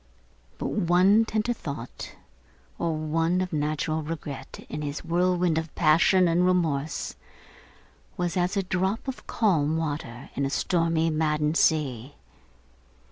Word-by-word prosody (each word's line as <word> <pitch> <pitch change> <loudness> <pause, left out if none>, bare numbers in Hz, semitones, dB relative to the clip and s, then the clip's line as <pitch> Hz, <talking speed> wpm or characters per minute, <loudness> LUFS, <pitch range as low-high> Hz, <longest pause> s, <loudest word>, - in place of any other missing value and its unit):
But - - -3
one 195 +3 +4
tender 220 +2 0
thought, 140 - -7 0.6
or 165 -2 0
one 165 +3 0
of 185 -2 -2
natural 155 +1 -1
regret, 150 -3 -7
in 150 - -5
his 145 0 -5
whirlwind 175 -1 +2
of 160 -2 -7
passion 170 +3 +4
and 170 +1 +2
remorse, 160 -5 0 1.0
was 175 -2 -1
as 180 +2 0
a 195 - +1
drop 190 +6 -1
of 265 - -6
calm 160 -8 +1
water 145 -6 -4
in 140 - -2
a 135 - 0
stormy 165 +1 +1
maddened 155 0 +1
sea. 140 -6 +1
165 Hz, 130 wpm, -26 LUFS, 150-180 Hz, 1.0 s, one